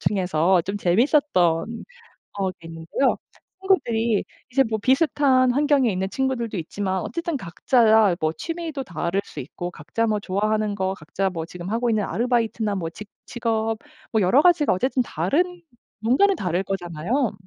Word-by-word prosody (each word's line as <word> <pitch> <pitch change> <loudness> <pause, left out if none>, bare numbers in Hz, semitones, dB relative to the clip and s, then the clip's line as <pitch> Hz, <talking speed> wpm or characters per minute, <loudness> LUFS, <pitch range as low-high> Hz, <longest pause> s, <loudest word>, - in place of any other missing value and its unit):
중에서 180 -2 +2
좀 195 +4 -4
재밌었던 250 - +2 1.1
어 190 -1 +1
게 165 -2 -14
있는데요. 165 +11 0 0.4
친구들이 235 - +1 0.3
이제 270 +2 +5
뭐 220 - 0
비슷한 265 0 +3
환경에 280 -2 +3
있는 190 0 -2
친구들도 235 -1 -2
있지만 190 +3 -3
어쨌든 325 - -3
각자 220 0 +3
뭐 155 0 +1
취미도 325 - -5
다를 175 0 -2
수 - - -8
있고 175 +6 -6
각자 170 +10 -2
뭐 215 -2 0
좋아하는 210 +2 -1
거 190 -1 -1
각자 190 +3 -2
뭐 165 -3 -4
지금 175 +2 -8
하고 235 +3 0
있는 215 -2 +1
아르바이트나 225 -2 0
뭐 170 -4 -3
직 210 +5 -11 0.2
직업 225 -2 -1 0.3
뭐 220 - +2
여러 220 +11 +4
가지가 335 -4 +4
어쨌든 255 +7 +1
다른 325 - -1 0.4
뭔가는 280 - +3
다를 180 - -1
거잖아요. 195 - -2
215 Hz, 335 characters per minute, -23 LUFS, 185-260 Hz, 1.1 s, 이제